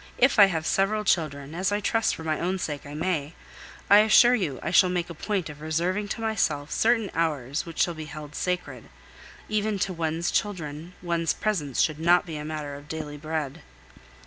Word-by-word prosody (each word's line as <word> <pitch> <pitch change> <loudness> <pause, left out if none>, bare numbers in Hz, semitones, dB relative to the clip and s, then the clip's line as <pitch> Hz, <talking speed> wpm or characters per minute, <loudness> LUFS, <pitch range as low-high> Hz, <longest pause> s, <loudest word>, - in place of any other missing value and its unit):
If 255 -3 +4
I 200 - +11
have 165 -4 -2
several 210 +4 +1
children, 150 -6 0
as 185 +3 0
I 205 - +1
trust 225 +1 +1
for 160 - -9
my 155 -1 -1
own 185 +2 -1
sake 150 -4 -4
I 145 - -8
may, 160 -2 -2 0.5
I 205 - +8
assure 220 +3 +6
you 175 - -1
I - - -2
shall 185 0 +6
make 175 -1 -2
a - - -5
point 190 +2 -2
of 150 -1 -10
reserving 175 +6 -1
to 225 - -4
myself 160 -10 -1
certain 225 -3 +2
hours 150 -3 -1
which 165 - -8
shall 175 - +2
be 160 -1 -7
held 150 0 -9
sacred; 180 +2 -3 0.6
even 215 -1 0
to 190 0 -1
one's 165 0 -1
children 170 -4 -3
one's 170 -2 0
presence 155 - -2
should 155 -1 0
not 175 +2 +4
be 160 -3 -6
a 150 - -5
matter 150 -2 -5
of 145 +1 -10
daily 150 -2 -5
bread. 155 -2 -4
165 Hz, 200 wpm, -26 LUFS, 150-195 Hz, 0.6 s, I